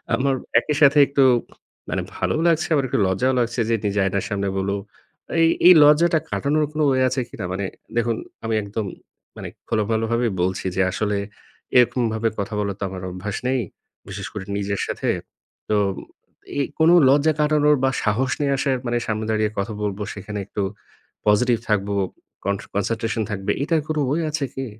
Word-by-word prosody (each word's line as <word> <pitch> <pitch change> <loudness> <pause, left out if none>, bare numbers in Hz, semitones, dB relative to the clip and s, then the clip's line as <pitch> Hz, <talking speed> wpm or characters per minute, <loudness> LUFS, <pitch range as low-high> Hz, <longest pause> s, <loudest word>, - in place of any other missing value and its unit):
আমার 135 0 +1 0.2
একই 150 - -2
সাথে 145 0 +6
একটু 140 -1 +2 0.7
মানে - - -1 0.2
ভালো - - 0
লাগছে, 165 0 +2
আবার 140 -3 +2
একটু - - 0
লজ্জাও 125 +8 +1
লাগছে, 120 0 -1
যে 115 - +3
নিজে 100 0 0
আয়নার 95 0 -1
সামনে 100 -1 -1
বলবো। 100 +1 -1 0.6
এই, 165 - +6 0.2
এই 180 - +11
লজ্জাটা 160 +3 +5
কাটানোর 150 +2 +1
কোন 155 - -1
ওয়ে 130 0 +2
আছে 130 +1 -1
কিনা? 95 - -6
মানে 95 +1 -2 0.3
দেখুন 115 0 +1 0.3
আমি 115 - 0
একদম 100 +1 -4 0.5
মানে - - -6 0.2
খোলোমেলাভাবে 115 +2 0
বলছি 95 +2 -1
যে 95 - +2
আসলে 105 +1 -1 0.6
এরকমভাবে 115 -2 +2
কথা 100 +2 -3
বলার 100 -1 -2
তো - - -4
আমার 95 0 -7
অভ্যাস 95 +3 -5
নেই। 130 -1 +1 0.5
বিশেষ - - -5
করে 100 -2 -6
নিজের 100 0 -2
সাথে। - - -2 0.6
তো 105 - +3 0.8
এই 140 - +2
কোনো 160 +2 +6 0.2
লজ্জা 150 +3 +4
কাটানোর 150 0 +4
বা - - +4
সাহস 120 +4 +1
নিয়ে 140 -1 +2
আসার 135 -1 +1
মানে 120 0 +1
সামনে 110 0 -2
দাঁড়িয়ে 110 -1 +1
কথা 105 +2 -2
বলবো, 105 0 -3
সেখানে 105 +1 -6
একটু 100 - -3 0.6
পজিটিভ 115 +3 +4
থাকবো, 100 -1 +1 0.5
কন 100 - +1 0.2
কনসেনট্রেশন 110 +2 -1
থাকবে। 100 0 -2
এটার 160 +1 +1
কোন 155 -1 -2
ওয়ে 165 +3 +1
আছে 150 -2 -1
কি? 135 - -3
115 Hz, 170 wpm, -22 LUFS, 100-140 Hz, 0.8 s, এই